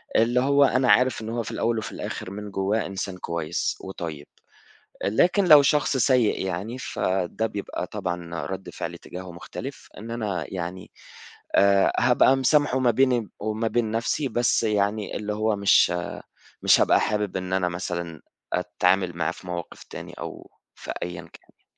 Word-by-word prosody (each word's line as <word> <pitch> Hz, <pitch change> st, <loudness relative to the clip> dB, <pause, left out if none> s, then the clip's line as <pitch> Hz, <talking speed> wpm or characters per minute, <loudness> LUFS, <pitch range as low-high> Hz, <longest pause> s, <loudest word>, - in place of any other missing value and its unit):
اللي 120 Hz, +2 st, +4 dB
هو 140 Hz, +2 st, +4 dB
أنا 130 Hz, -1 st, +3 dB
عارف 125 Hz, -3 st, +3 dB
إن 110 Hz, -, -5 dB
هو 115 Hz, 0 st, -2 dB
في -, -, -6 dB
الأول 115 Hz, 0 st, 0 dB
وفي 110 Hz, -, -4 dB
الآخِر 95 Hz, -, -6 dB
من 105 Hz, 0 st, -7 dB
جوّاه 100 Hz, +3 st, 0 dB
إنسان 95 Hz, -1 st, -4 dB
كويس 85 Hz, -1 st, -2 dB
وطيب، 80 Hz, -6 st, -6 dB, 0.8 s
لكن 180 Hz, -, +3 dB
لو 150 Hz, -4 st, +9 dB
شخص 145 Hz, -1 st, +2 dB
سيئ 125 Hz, -5 st, +3 dB
يعني 95 Hz, +7 st, -4 dB
فده 95 Hz, -1 st, -1 dB
بيبقى 100 Hz, -2 st, -5 dB
طبعًا 85 Hz, -2 st, -5 dB
رَد 95 Hz, 0 st, -6 dB
فعلي -, -, -6 dB
تجاهه 90 Hz, 0 st, -9 dB
مختلِف 85 Hz, -, -8 dB
إن 115 Hz, +2 st, -8 dB
أنا 105 Hz, -8 st, -2 dB
يعني 90 Hz, +1 st, -5 dB, 0.7 s
آآ 100 Hz, 0 st, +5 dB
هابقى 130 Hz, +2 st, +5 dB
مسامحة 135 Hz, 0 st, +3 dB
ما 125 Hz, -2 st, +4 dB
بيني 125 Hz, -3 st, +2 dB
وما 110 Hz, +2 st, -1 dB
بين 110 Hz, -1 st, 0 dB
نفْسي 115 Hz, +5 st, 0 dB
بس 120 Hz, 0 st, +1 dB
يعني 105 Hz, -1 st, 0 dB
اللي 105 Hz, 0 st, -3 dB
هو 110 Hz, 0 st, +1 dB
مش 100 Hz, -3 st, +4 dB, 0.7 s
مش -, -, +5 dB
هابقى -, -, +4 dB
حابب 105 Hz, -3 st, -1 dB
إن 95 Hz, 0 st, -4 dB
أنا 90 Hz, -2 st, +1 dB
مثلًا 85 Hz, -3 st, -5 dB, 0.3 s
أتعامل 90 Hz, 0 st, +1 dB
معه 80 Hz, -2 st, 0 dB
في 90 Hz, -, -12 dB
مواقف 85 Hz, -1 st, -6 dB
تاني -, -, -9 dB
أو -, -, -8 dB, 0.2 s
في -, -, -7 dB
أيًا 85 Hz, -1 st, -5 dB
كان 80 Hz, -, -15 dB, 0.2 s
يعني. -, -, -44 dB
105 Hz, 165 wpm, -25 LUFS, 90-120 Hz, 0.8 s, لو